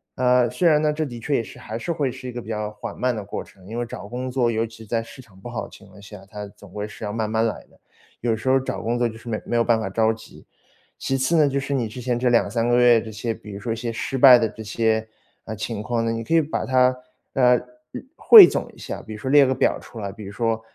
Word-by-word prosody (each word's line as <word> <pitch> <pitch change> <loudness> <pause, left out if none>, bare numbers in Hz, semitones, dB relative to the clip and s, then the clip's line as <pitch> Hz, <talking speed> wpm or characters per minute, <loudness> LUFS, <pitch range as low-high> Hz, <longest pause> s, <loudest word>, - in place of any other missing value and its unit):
啊， 125 -1 +3
虽 170 +9 +2
然 150 -1 +4
呢， 150 -1 +1
这 155 - -2
的 120 -3 -8
确 140 +4 -1
也 115 - 0
是， - - -12
还 110 - -6
是 120 +9 -4
会 145 -4 -1
是 130 0 -8
一 - - -5
个 120 0 -6
比 110 - -15
较 105 -1 -3
缓 105 0 -8
慢 125 0 0
的 105 -3 -6
过 100 - -5
程， 95 -2 -20
因 115 - -6
为 120 - -1
找 110 - -8
工 125 +3 -5
作， 125 -2 +1
尤 115 0 0
其 110 0 -12
在 115 +2 -1
市 115 +3 -13
场 100 -6 -21
不 120 - -8
好 120 - -4
的 - - -13
情 105 - -16
况 100 +1 -16
下， 105 -1 -12
它 105 -1 -7
总 100 -1 -16
归 105 0 -5
是 110 - -11
要 105 - -3
慢 110 -1 -2
慢 110 +1 +1
来 115 - -3
的。 - - -25 0.4
有 120 - -2
的 110 - 0
时 115 - -8
候 135 +1 +4
找 130 - -4
工 120 +2 -1
作 120 - +1
就 110 - -10
是 120 - -16
没 110 -2 -3
没 120 - -3
有 115 - +3
办 115 -1 +2
法 95 - -3
着 110 +3 +2
急。 110 - -14 0.5
其 135 - -1
次 150 +6 +1
呢， 150 -2 +5
就 140 - -1
是 140 +1 -3
你 120 -4 0
之 115 +4 -9
前 120 0 -1
这 125 0 +2
2-3 115 0 +1
个 120 - +3
月 120 -2 +5
这 110 - -8
些， 115 +2 -3
比 105 -1 -12
如 100 - -7
说 115 0 -3
一 - - -4
些 115 0 -4
失 125 +4 -4
败 130 -1 +9
的 115 -1 +1
这 110 +1 -10
些， 110 +1 0 0.4
呃， 110 - -5
情 110 0 -4
况 115 0 -1
呢， 115 - 0
你 115 0 -3
可 165 - 0
以 165 - +6
把 150 - -3
它， 130 -1 +3 0.4
呃， 125 -2 +5 0.4
日 - - -8
汇 435 -5 +10
总 - - -3
一 - - -20
下， - - -7
比 110 - -9
如 105 - -8
说 130 +5 -3
列 145 -1 +7
个 130 0 +1
表 - - +1
出 115 - -11
来， 100 -1 -4
比 105 0 -11
如 100 - -8
说 115 0 -1
115 Hz, 325 characters per minute, -23 LUFS, 110-125 Hz, 0.5 s, 汇